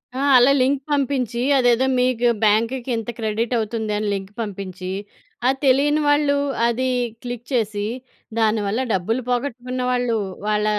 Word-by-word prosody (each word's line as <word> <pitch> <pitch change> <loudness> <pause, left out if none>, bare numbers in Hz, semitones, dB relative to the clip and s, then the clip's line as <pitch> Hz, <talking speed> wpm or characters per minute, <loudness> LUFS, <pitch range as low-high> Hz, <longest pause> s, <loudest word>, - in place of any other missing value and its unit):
ఆ! - - -3 0.2
అలా 250 +2 +6
లింక్ 275 +2 +2
పంపించి 260 -4 0 0.2
అదేదో 245 0 +3
మీకు 250 -1 +2 0.2
బ్యాంకుకి 230 +4 +1
ఇంత 225 +1 -5
క్రెడిట్ 225 +2 -1
అవుతుందని 215 -1 -2
లింక్ 195 0 -5
పంపించి, 185 -3 -5 0.6
ఆ - - +5 0.2
తెలియని 285 +3 +3
వాళ్ళు 290 -1 +3 0.3
అది 250 +2 0 0.4
క్లిక్ 245 -1 -6
చేసి, 210 -3 0 0.5
దాని 220 -1 +2
వల్ల 215 +5 -1
డబ్బులు 225 +7 -1
పోగొట్టుకున్న 250 0 -2
వాళ్ళు 245 -2 0 0.3
వాళ్ళ 210 0 +1
235 Hz, 135 wpm, -21 LUFS, 215-255 Hz, 0.6 s, అలా